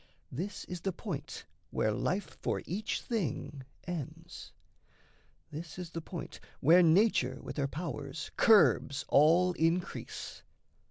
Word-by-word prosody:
This 185 +10 -5
is 180 -1 -6
the 195 - -1
point 170 -6 -6 0.2
where 110 - +1
life 185 - -2
for - - -1
each 205 +4 -2
thing 155 - -3 0.2
ends; 170 -6 -7 1.0
This 160 +2 -7
is 180 -2 -6
the 165 - -4
point 170 +1 -7 0.2
where 170 +6 +6
nature 160 - +3
with - - -8
her 140 -1 +1
powers 145 -1 -5
Curbs 205 - +4
all 170 +5 +5
increase. 170 +3 -2
170 Hz, 120 wpm, -32 LUFS, 145-180 Hz, 1.0 s, where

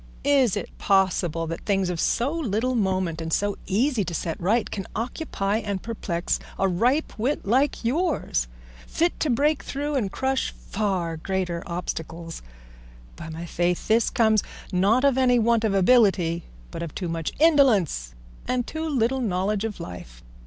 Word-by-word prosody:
Is 270 -8 +4
it - - -6
possible 180 -4 +2
that 165 +1 -5
things 195 -3 +1
of 170 - -4
so 245 - +1
little 255 -5 0
moment 185 -7 0
and 160 0 -4
so 205 +4 +1
easy 230 +3 +1
to 175 - -4
set 165 +1 -3
right 215 +6 +2
can 195 -3 -4
occupy 220 -4 -2
and 205 -3 -3
perplex 185 -7 -2 0.2
a 195 - +2
ripe 245 - +1
wit 260 +7 -1
like 255 +4 +1
yours, 280 - 0 0.4
fit 340 +1 0
to 310 - 0
break 285 +5 +2
through 290 +2 -3
and 225 -9 0
crush 265 0 0
far 185 -6 -2
greater 180 0 -2
obstacles? 170 -1 -5 0.7
By 170 - -8
my 165 +2 -6
faith, 175 +1 -1
this 225 +1 +3
comes, 220 -3 +3 0.3
not 200 +7 +3
of 270 -2 +3
any 250 -1 +4
want 230 0 +3
of 210 -3 +1
ability, 190 -5 +3 0.3
but - - -6
of 165 -3 -6
too 180 - -3
much 165 -1 -2
indolence 220 - +3 0.3
and 250 -1 0
too 320 +3 -4
little 260 -1 +1
knowledge 200 0 0
of 220 -2 -5
life. 60 -10 -9
205 Hz, 160 wpm, -25 LUFS, 175-250 Hz, 0.7 s, Is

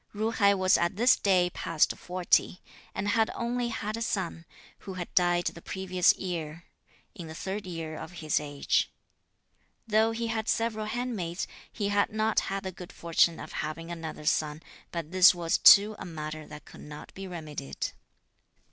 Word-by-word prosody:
Ju 220 +2 0
hai 200 -3 +4
was 185 -1 +3
at 170 +1 0
this 240 +5 +5
date 180 -3 +2
past 165 -2 +1
forty; 180 0 +1 0.4
and 200 +2 -1
had 220 +1 +3
only 240 +1 -1
had 215 -2 -3
a 230 - -5
son, 185 -6 -2 0.3
who 190 - -8
had 175 -1 -6
died 175 0 +3
the 170 - -3
previous 185 -1 +2
year, 165 -3 -5 0.5
in 175 -6 -8
the 160 - -8
third 195 +3 -4
year 165 -3 -5
of 160 - -8
his 155 -3 0
age. 145 -1 0 0.9
Though 220 0 +3
he 230 +1 -3
had 225 -1 -2
several 220 -2 0
handmaids, 215 -7 -3 0.3
he 205 -3 -2
had 205 0 +2
not 215 0 +2
had 195 0 -3
the 190 - -4
good 180 -1 -10
fortune 170 0 +2
of - - -8
having 165 +2 -5
another 160 -2 -6
son; 155 0 0 0.3
but 165 -2 -5
this 185 0 +7
was 170 -1 0
too 210 +2 +8
a - - -6
matter 155 -2 -6
that 150 - -11
could - - -13
not 150 0 -10
be 195 0 -7
remedied. 155 - -5
180 Hz, 175 wpm, -28 LUFS, 165-210 Hz, 0.9 s, too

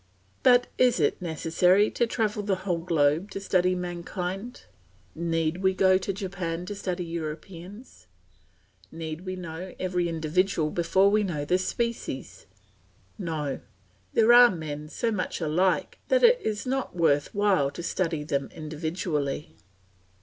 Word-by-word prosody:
But 245 -1 +6
is 250 -1 +4
it - - +1
necessary 180 +4 +2
to 240 - +1
travel 215 -2 -1
the 200 -1 0
whole 175 -3 0
globe 165 +1 +1
to - - -5
study 185 -2 +2
mankind? 180 +5 -5 0.5
Need 165 0 -1
we 190 0 +1
go 185 0 +4
to 195 - -2
Japan 185 -3 -4
to 205 - -5
study 180 -3 -3
Europeans? 170 - -8 0.8
Need 160 +2 -6
we 185 - -3
know 180 +1 -7
every 180 -2 0
individual 160 0 0
before 190 +3 +3
we 215 +1 +3
know 160 -8 -2
the 180 +5 +2
species? 185 - -4 0.7
No, 150 -5 -3 0.5
there 225 +2 +5
are 245 0 +9
men 150 -4 -5
so 230 +7 -1
much 205 -4 -2
alike 175 +3 0
that - - +3
it 485 0 +6
is 210 - -2
not 265 -4 -2
worth 150 -3 +2
while 200 -9 +3
to 170 - -8
study 165 -3 -1
them 140 -2 -2
individually. 155 -2 -3
180 Hz, 140 wpm, -27 LUFS, 160-195 Hz, 0.8 s, are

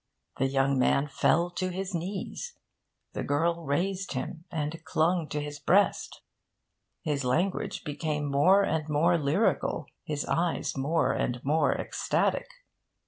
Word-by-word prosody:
The 135 - +3
young 135 0 +2
man 140 +2 +3
fell 170 +4 +2
to 185 +1 -2
his 190 +1 -4
knees; 190 - -4 0.6
the - - -3
girl 165 +4 0
raised 185 +7 -1
him, 155 +5 -5
and 160 0 -4
clung 160 +1 +1
to 150 - -2
his 145 0 -5
breast. 195 +7 +2 0.8
His 145 -4 -1
language 175 +10 0
became 150 -1 -2
more 145 +8 +4
and 160 -4 -1
more 165 +4 +3
lyrical, 140 -1 +1 0.2
his 150 -2 -3
eyes 170 0 0
more 150 +5 +1
and 125 0 -1
more 155 +3 +3
ecstatic. - - 0
160 Hz, 135 wpm, -28 LUFS, 145-175 Hz, 0.8 s, more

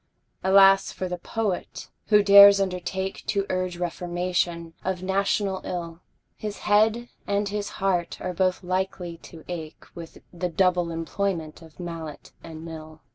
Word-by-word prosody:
Alas 195 0 +6
for 185 - -4
the 180 0 -5
Poet, 210 -2 -4 0.2
who 210 -1 +5
dares 200 0 +9
undertake 190 0 -3
To 200 -2 0
urge 185 -1 -2
reformation 175 -1 -2
of 185 -1 -3
national 195 0 0
ill! 170 -2 -5 0.4
His 210 -1 -6
head 220 +3 +3 0.2
and 200 0 0
his 205 0 -3
heart 180 -3 -1
are 185 - -4
both 185 +1 0
likely 185 -1 -3
to 165 -1 -13
ache 160 -3 -7
With 165 -1 -10 0.2
the 180 +1 -3
double 180 0 +2
employment 165 -1 -3
of 160 0 -16
mallet 165 -4 -7
and 160 0 -9
mill. 160 -1 -10
180 Hz, 140 wpm, -25 LUFS, 170-195 Hz, 0.4 s, dares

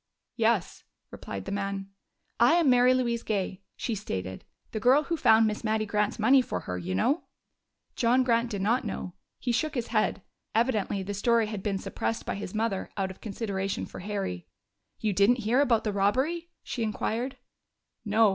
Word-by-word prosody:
"Yes," - - +1 0.3
replied 95 -1 -7
the - - -5
man. 195 -1 -3 0.5
"I - - +6
am 330 -6 +4
Mary 250 0 +6
Louise 240 -2 +1
Gay," 195 -4 -2
she 235 - -2
stated. 95 - -4 0.3
"The 220 - -3
girl 260 +7 +5
who 335 - -1
found 225 -7 +5
Miss 215 +1 -2
Mattie 215 0 +1
Grant's 210 0 0
money 260 +5 +5
for 245 - -4
her, 90 - -4
you 90 +1 -3
know." 280 - +1 0.7
John 250 +2 +3
Grant 235 -1 +2
did 200 -4 -3
not 235 +6 +2
know; 190 -4 -5 0.2
he 245 - -2
shook 305 +6 0
his 240 -3 -2
head. 215 -4 +1 0.3
Evidently 215 -4 +1
the 205 +2 -4
story 230 +3 +3
had 210 -2 -5
been 200 -1 -1
suppressed 225 +3 -3
by - - -2
his 200 0 -6
mother 215 -3 -1
out 190 -1 -1
of 190 - -14
consideration 200 -2 -3
for - - -10
Harry. 195 - -4 0.5
"You 215 -2 0
didn't 210 +5 +3
hear 245 +5 +4
about 235 -6 +3
the 210 - -1
robbery?" 265 - +1
she 245 - -4
inquired. 225 +3 -2 0.7
"No. 215 0 +4
220 Hz, 180 wpm, -28 LUFS, 200-245 Hz, 0.7 s, I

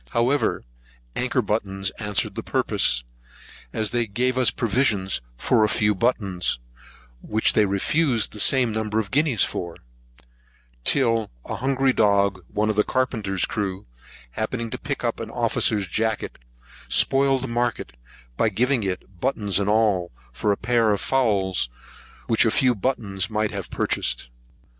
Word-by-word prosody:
However, 125 - +1 0.5
anchor 125 0 0
buttons 95 -2 -2
answered 105 -2 -1
the - - -4
purpose, - - +1 0.7
as 110 - -1
they 120 -1 0
gave 125 +5 0
us 130 -2 +4
provision 115 -5 0 0.3
for 110 - +2
a 105 - +3
few 105 0 +2
buttons, 100 -5 0 0.6
which 110 +1 +2
they 105 -1 +3
refused 120 +6 +1
the 105 - -7
same 125 +2 +4
number 110 0 -2
of 110 -3 -1
guineas 140 -6 +3
for; 85 -2 -3 1.1
till 115 - +2 0.2
a - - -4
hungry 135 +1 +1
dog, 100 -3 +2
one 105 +1 -1
of 105 - -6
the 105 - +5
carpenter's 110 -8 -1
crew, 95 -2 -4 0.5
happening 115 - -3
to - - -5
pick - - -4
up - - -1
an - - -5
officer's 105 -2 +1
jacket, 110 +4 -2 0.5
spoiled 135 -1 +3
the - - -3
market, 120 - -2 0.4
by - - +3
giving 125 +1 +1
it, 95 -2 -5
buttons 105 -7 +1
and 100 0 0
all, 105 -5 +2 0.2
for 105 - 0
a 100 - 0
pair 115 -1 +2
of 100 -2 +1
fowls, 95 - +1 0.6
which 115 - +3
a 115 - +3
few 125 +3 +3
buttons 100 -4 -1
might 110 -1 -1
have 100 -3 -6
purchased. - - -1
110 Hz, 150 wpm, -23 LUFS, 100-125 Hz, 1.1 s, the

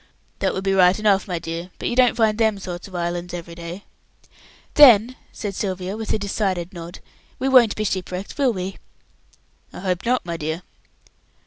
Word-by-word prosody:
"That - - 0
would 190 - -3
be 195 0 +1
right 185 -1 +5
enough, 210 -2 +2
my 180 -3 -2
dear, 165 +2 -5
but - - -4
you 240 - -1
don't 250 -1 +4
find 220 -2 +3
them 220 -2 +2
sort 180 -2 -7
of 190 - -12
islands 175 0 -3
every 170 -1 -8
day." 170 +3 -8 0.9
"Then," 250 -4 +7 0.2
said 205 -2 -5
Sylvia, 190 0 -3
with 220 -1 -4
a - - +2
decided 195 -3 -2
nod, 170 0 -9 0.4
"we 265 - -1
won't 250 -5 +5
be 215 - -2
ship 190 -3 -2
wrecked, 185 +2 -6
will 275 -4 +2
we?" 190 -2 -5 0.9
"I - - -9
hope 185 -1 -1
not, 245 -2 0
my 170 -1 -4
dear." 160 +3 -4
190 Hz, 190 wpm, -22 LUFS, 175-215 Hz, 0.9 s, Then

